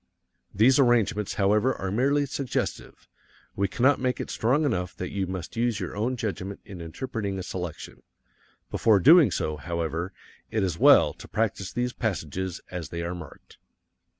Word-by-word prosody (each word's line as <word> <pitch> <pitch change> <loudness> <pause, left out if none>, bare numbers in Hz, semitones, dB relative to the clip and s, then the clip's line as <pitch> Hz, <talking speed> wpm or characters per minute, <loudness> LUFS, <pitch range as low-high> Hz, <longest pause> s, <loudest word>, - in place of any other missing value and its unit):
These 125 +7 +4
arrangements, 115 -5 +2
however, 105 +6 +2
are 95 -1 -4
merely 140 +6 +2
suggestive 140 -1 -4 0.5
we 100 0 +1
cannot 130 +9 +2
make 125 -1 -1
it - - -4
strong 135 +7 +1
enough 90 -9 -1
that 90 - -5
you 95 -2 -2
must 95 +3 -6
use 115 -2 0
your 90 -1 -5
own 120 +5 -1
judgment 100 -3 -4
in 95 -4 -9
interpreting 100 +3 -4
a 95 - -4
selection. 90 -3 -6 0.7
Before 110 -3 +4
doing 155 - +7
so, 75 -3 -2
however, 85 +2 -3 0.4
it 110 -2 0
is 90 -4 -2
well - - +6
to - - -12
practise 105 -3 -2
these 125 0 -2
passages 95 -4 -3
as 90 -3 -5
they 85 0 -4
are 85 +1 -3
marked. 85 -3 -12
100 Hz, 160 wpm, -26 LUFS, 90-120 Hz, 0.7 s, doing